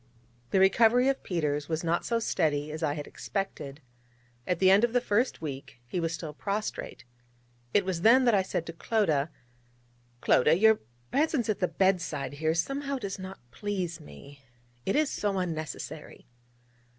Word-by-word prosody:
The 195 - +2
recovery 230 +6 +5
of 275 - -1
Peters 150 -4 -2
was 160 0 -1
not 170 +1 0
so 235 - +1
steady 155 -9 0
as 155 +1 -6
I 150 -2 0
had 145 -1 -5
expected. 160 -7 -5 0.7
At 180 - +1
the 185 +1 +5
end 200 +3 +6
of 240 -1 +2
the 245 - +4
first 230 -4 0
week 135 -4 -6
he 150 +9 -3
was 165 -1 -1
still 160 -2 -5
prostrate. 205 -1 -4 0.7
It 200 - +3
was 185 -3 -2
then 250 +6 +6
that 235 - +4
I 200 - +4
said 180 -3 -3
to 165 - -7
Clodagh: 165 - +1 0.9
'Clodagh, 150 +7 +4
your 220 +1 +6 0.3
presence 285 -5 +1
at 215 - 0
the 180 - +2
bed 190 -1 +2
side 145 -4 -4
here 160 0 +2
somehow 275 - -1
does 200 -5 -5
not 190 +1 -8
please 185 - -3
me. 140 -2 -13 0.4
It 195 - +1
is 300 -1 +2
so 205 -2 -1
unnecessary.' 160 -3 -5
185 Hz, 170 wpm, -29 LUFS, 155-215 Hz, 0.9 s, end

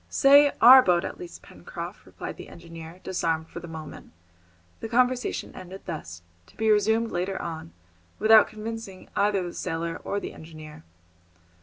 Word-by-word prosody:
"Say 285 +1 +6
'our' 260 +2 +10
boat, 180 -6 +2
at - - -7
least, 355 -1 -10
Pencroft," - - -9
replied - - -8
the - - -10
engineer, 165 0 -11
disarmed 165 -3 -2
for - - -8
the 170 - -10
moment. 160 - -10 0.7
The 225 - -6
conversation 250 +1 0
ended 185 +1 -10
thus, 85 - -7 0.2
to - - -22
be 220 0 +2
resumed 220 +2 +2
later 185 +2 -2
on, 160 - -6 0.5
without 220 0 +6
convincing 215 -3 -8
either 200 -2 +1
the 175 - -6
sailor 165 -1 -4
or 200 - -2
the - - -7
engineer. 155 - -12
185 Hz, 155 wpm, -26 LUFS, 165-225 Hz, 0.7 s, our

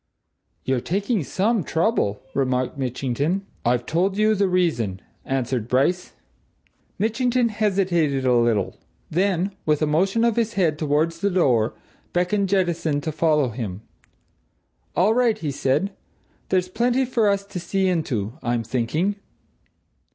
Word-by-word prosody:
"You're 130 -2 0
taking 200 - -1
some 205 - 0
trouble," 160 - 0
remarked 130 -2 0
Mitchington. 140 +7 -1 0.2
"I've 120 0 +1
told 190 +4 0
you 215 +1 +4
the 200 -1 +2
reason," 135 - 0 0.3
answered 130 -3 -1
Bryce. 140 +9 +1 0.8
Mitchington 240 +3 +1
hesitated 185 -10 +1
a 125 - +4
little; 115 -5 +1 0.3
then, 185 +2 +1
with 150 -1 +2
a 155 - +2
motion 190 +9 +1
of 235 -1 +2
his 230 -1 +1
head 165 -6 +1
towards 155 +2 0
the 200 - +1
door, 130 - +2 0.4
beckoned 185 +3 +1
Jettison 170 -6 +1
to 155 - -3
follow 150 -3 +2
him. 110 -4 -5 1.1
"All 195 +5 +4
right," 240 -2 +2
he 150 -3 -3
said. 135 +9 0 0.6
"There's 185 -1 +1
plenty 245 +6 +1
for 230 -4 +2
us 200 0 0
to 200 -2 -6
see 190 +2 0
into, 130 - -2
I'm 120 -1 -1
thinking!" 130 - -1
170 Hz, 135 wpm, -23 LUFS, 130-200 Hz, 1.1 s, you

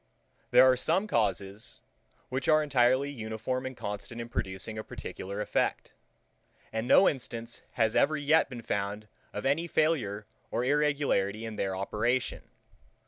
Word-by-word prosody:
There - - +7
are 130 0 +6
some 165 +10 +1
causes, 100 - -2 0.5
which 130 +1 -2
are 155 0 +5
entirely 130 0 +3
uniform 115 +1 -3
and 130 -1 -8
constant 105 +3 -5
in 115 0 -6
producing 100 +2 -4
a - - -4
particular 100 0 -6
effect; - - -1 0.8
and 110 +2 -2
no 190 - +7
instance 120 -3 -3
has 110 -2 +1
ever 155 +2 +3
yet 150 +2 +3
been 120 -3 -8
found 100 +1 -3 0.2
of 105 - -5
any 155 +5 +1
failure 125 -12 0 0.2
or 120 - -1
irregularity 140 -8 +1
in 110 -1 -6
their 95 -2 -1
operation. 110 +6 -1
120 Hz, 140 wpm, -29 LUFS, 105-140 Hz, 0.8 s, There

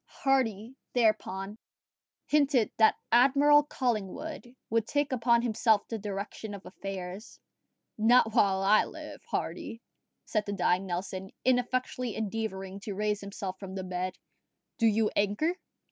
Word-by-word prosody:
Hardy, 245 -3 0 0.2
thereupon, 215 -3 0 0.7
hinted 280 -6 +3
that 220 - +5 0.2
Admiral 280 +4 +6
Collingwood 250 - -3 0.2
would 225 -1 +1
take 290 -1 0
upon 235 -1 +3
himself 220 -2 +2
the 225 - -4
direction 205 +1 -5
of 200 - -12
affairs. 195 +2 -7 0.6
"Not 225 0 +5
while 195 -2 +3
I 210 +2 +5
live, - - -9
Hardy," 230 - -3 0.5
said 215 -2 -1
the 200 - -2
dying 190 -1 +1
Nelson, 185 +1 -4 0.2
ineffectually 250 -2 0
endeavouring 200 -3 -4
to 205 -1 -6
raise 210 0 -1
himself 200 -1 -6
from 195 -1 -7
the 190 - -4
bed: 185 0 -3 0.6
"do 230 - +4
you 220 0 +2
anchor." 210 - +1
215 Hz, 130 wpm, -29 LUFS, 195-245 Hz, 0.7 s, Admiral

